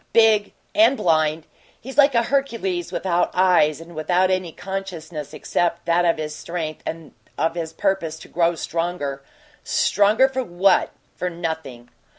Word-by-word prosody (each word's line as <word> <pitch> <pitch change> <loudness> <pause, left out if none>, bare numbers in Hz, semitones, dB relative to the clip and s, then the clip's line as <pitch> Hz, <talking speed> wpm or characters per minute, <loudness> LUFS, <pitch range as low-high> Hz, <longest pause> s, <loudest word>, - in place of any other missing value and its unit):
Big 220 -2 +4 0.2
and 230 +6 +5
blind. 155 -1 +1 0.3
He's 265 +3 -9
like 285 -2 +5
a 235 - +4
Hercules 230 -10 -1
without 175 -2 0
eyes 180 -5 +4
and 165 +1 -12
without 180 +4 +1
any 185 -2 -1
consciousness 175 -5 -6
except 170 -1 -1
that 170 +1 +2
of 170 - +2
his 150 -1 -4
strength 160 -2 -5
and 165 -2 -6 0.2
of 160 +3 +1
his 165 -2 -4
purpose 170 -3 -1
to - - -11
grow 170 0 +1
stronger. 165 -4 -3 0.4
Stronger 260 -6 +3
for 260 -1 -2
what? 185 -1 +2 0.3
For 180 - -2
nothing." 160 -8 -5
175 Hz, 150 wpm, -22 LUFS, 160-195 Hz, 0.4 s, and